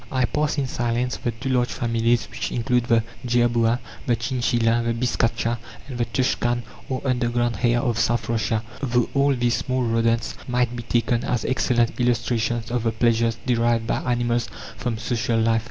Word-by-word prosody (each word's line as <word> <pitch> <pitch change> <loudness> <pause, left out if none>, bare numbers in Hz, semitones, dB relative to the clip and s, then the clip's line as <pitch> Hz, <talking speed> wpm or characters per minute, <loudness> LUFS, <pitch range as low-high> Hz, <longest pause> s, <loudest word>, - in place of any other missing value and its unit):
I 130 -1 +2
pass 150 +4 -1
in 140 - +1
silence 120 0 -1
the - - -2
two 120 +4 -4
large 125 -1 +2
families 115 0 +1
which - - -4
include 125 0 +1
the 115 -3 +3 0.2
jerboa, 120 -1 +2 0.3
the 120 - +3
chinchilla, 120 -1 +1
the 115 0 0
biscacha, 115 -1 0 0.3
and 125 -3 -6
the 120 - +2
tushkan, 120 -1 0 0.3
or 130 -1 -3
underground 120 -2 0
hare 120 +1 +2
of 120 -2 0
South 120 0 +1
Russia, 115 -1 0 0.2
though 120 -3 +1
all 140 0 +3
these 120 -1 +1
small 130 -1 -1
rodents 115 0 +1
might 125 -1 0
be 120 - -4
taken 120 0 0
as 120 -2 -1
excellent 120 -2 +1
illustrations 120 -1 0
of 120 -1 0
the 115 0 +1
pleasures 115 0 +2
derived 115 -2 +2
by - - -1
animals 120 0 0 0.3
from 120 -2 -3
social 115 0 0
life. 115 0 +3
120 Hz, 170 wpm, -23 LUFS, 115-125 Hz, 0.3 s, the